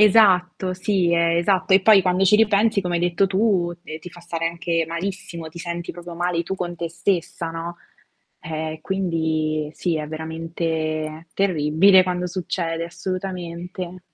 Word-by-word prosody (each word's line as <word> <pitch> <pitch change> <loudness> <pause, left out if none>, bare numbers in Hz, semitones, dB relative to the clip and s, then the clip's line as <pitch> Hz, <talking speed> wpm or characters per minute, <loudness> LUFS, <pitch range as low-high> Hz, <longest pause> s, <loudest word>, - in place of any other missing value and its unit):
Esatto, 185 -3 +4
sì, 185 -2 +1
è 170 0 +3
esatto. 185 +1 +2
E 195 - +7
poi 205 -1 +7
quando 180 +1 +1
ci 200 +2 +6
ripensi, 215 0 +3
come 180 -2 -2
hai 170 - +1
detto 175 +2 +2
tu, 190 -3 +1
e 155 -2 -7
ti 165 - -10
fa 175 - -13
stare 165 -1 -3
anche 165 0 -1
malissimo, 170 -1 -5
ti 165 +2 -11
senti 170 0 -4
proprio 175 0 -9
male 175 0 -1
tu 190 - -3
con 175 -2 -4
te 170 0 -3
stessa, 170 -1 -1
no. 165 +1 -6 0.6
Eh, 155 0 -4
quindi 160 -4 -1
sì, 175 -3 -1
è 155 -1 -3
veramente 160 0 -3
terribile 185 +1 +4
quando 180 0 -2
succede, 170 -2 -2
assolutamente. 180 0 -5
175 Hz, 155 wpm, -22 LUFS, 165-185 Hz, 0.6 s, E